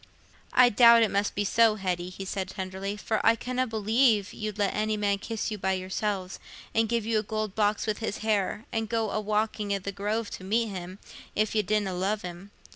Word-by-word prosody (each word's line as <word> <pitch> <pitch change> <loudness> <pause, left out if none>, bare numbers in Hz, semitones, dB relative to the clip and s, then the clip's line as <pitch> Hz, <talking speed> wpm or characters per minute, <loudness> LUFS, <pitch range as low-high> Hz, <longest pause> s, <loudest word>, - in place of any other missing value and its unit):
"I 250 -1 +7
doubt 235 0 +7
it 220 - +1
must 200 +1 0
be 205 - 0
so, 225 +1 +4
Hetty," 180 -3 -2
he 195 +1 -8
said, 190 0 -3
tenderly; 190 +1 -5
"for 220 +1 -1
I 225 - +5
canna 255 +2 -2
believe 220 -1 +2
you'd 215 -1 -5
let 205 -2 +1
any 215 0 0
man 200 -1 +1
kiss 225 +1 -3
you 210 - -4
by 190 0 +1
yourselves, 190 0 -3 0.3
and 225 -1 +2
give 230 -2 0
you 225 -1 +2
a - - 0
gold 215 -1 -3
box 210 0 +1
with 215 -2 -2
his 220 -2 -3
hair, 210 0 0
and 225 -2 -2
go 225 -2 0
a - - -1
walking 210 0 -1
i' - - 0
the 195 +1 -5
Grove 210 +3 -2
to - - -7
meet 225 +4 +1
him, 185 -1 -7 0.4
if 215 0 +1
you 215 - +3
didna 210 -1 0
love 195 +4 -1
him. 180 +2 -8
210 Hz, 215 wpm, -27 LUFS, 195-220 Hz, 0.4 s, I